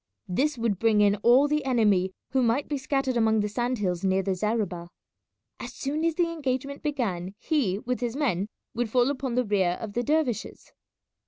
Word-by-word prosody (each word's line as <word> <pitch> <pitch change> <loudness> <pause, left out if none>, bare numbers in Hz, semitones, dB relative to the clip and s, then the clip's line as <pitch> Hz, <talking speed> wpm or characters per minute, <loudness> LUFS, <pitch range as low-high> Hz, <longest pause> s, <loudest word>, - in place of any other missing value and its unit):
This 275 +10 0
would 225 -5 -1
bring 225 -2 +3
in 205 0 +4
all 245 +7 +5
the 300 0 0
enemy 210 -8 +2 0.2
who 265 - +2
might 245 +4 +1
be 290 -2 -2
scattered 265 -1 -1
among 220 -2 +3
the 205 - 0
sand 240 +4 -1
hills 180 -4 -2
near 190 0 +2
the 195 0 0
zareba. 190 -4 -2 0.7
As - - -7
soon 295 +3 -2
as 330 -1 +1
the 340 -1 +1
engagement 280 -3 -3
began 205 - -2
he, 235 - 0
with 250 +4 -3
his 240 0 -2
men, 220 - 0 0.3
would 235 -1 -1
fall 250 +3 +3
upon 260 -3 -3
the 250 0 +2
rear 190 -4 +1
of 215 -3 -6
the 240 - 0
dervishes. 290 -3 -1
240 Hz, 190 wpm, -26 LUFS, 205-275 Hz, 0.7 s, all